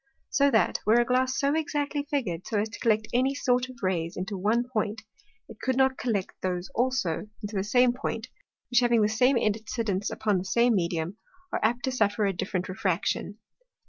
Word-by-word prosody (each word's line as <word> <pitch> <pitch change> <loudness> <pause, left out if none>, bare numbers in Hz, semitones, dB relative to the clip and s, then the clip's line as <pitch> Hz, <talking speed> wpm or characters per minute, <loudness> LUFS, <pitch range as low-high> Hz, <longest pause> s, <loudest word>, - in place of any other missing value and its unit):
So 280 +1 +4
that, 225 -5 +2
were 225 +3 +4
a 240 - +3
Glass 255 +2 +1
so 280 +1 +2
exactly 295 -2 -1
figur'd, 190 - -2
so 220 - -1
as 210 +2 0
to 225 - -9
collect 220 -3 +2
any 260 +3 +2
one - - -9
sort 250 -2 +1
of 245 -4 -13
Rays 170 -3 -1
into 190 +3 -3
one 220 +6 +1
Point, 220 -2 -2 0.4
it 225 - -13
could 260 0 0
not 265 0 +3
collect 210 -6 -1
those 180 -1 -3
also 245 -8 0 0.2
into 205 +1 -5
the 190 - 0
same 245 +4 +4
Point, 230 -3 -4 0.4
which 245 - +5
having 240 -3 +3
the - - +4
same 250 +4 +3
Incidence 215 -2 -1
upon 210 -4 0
the - - -4
same 235 +6 +3
Medium, 170 0 -1 0.4
are - - +1
apt 240 +3 +1
to 260 - 0
suffer 210 -3 +1
a 195 - +1
different 185 +1 -3
Refraction. 185 +2 -1
225 Hz, 200 wpm, -27 LUFS, 200-250 Hz, 0.4 s, which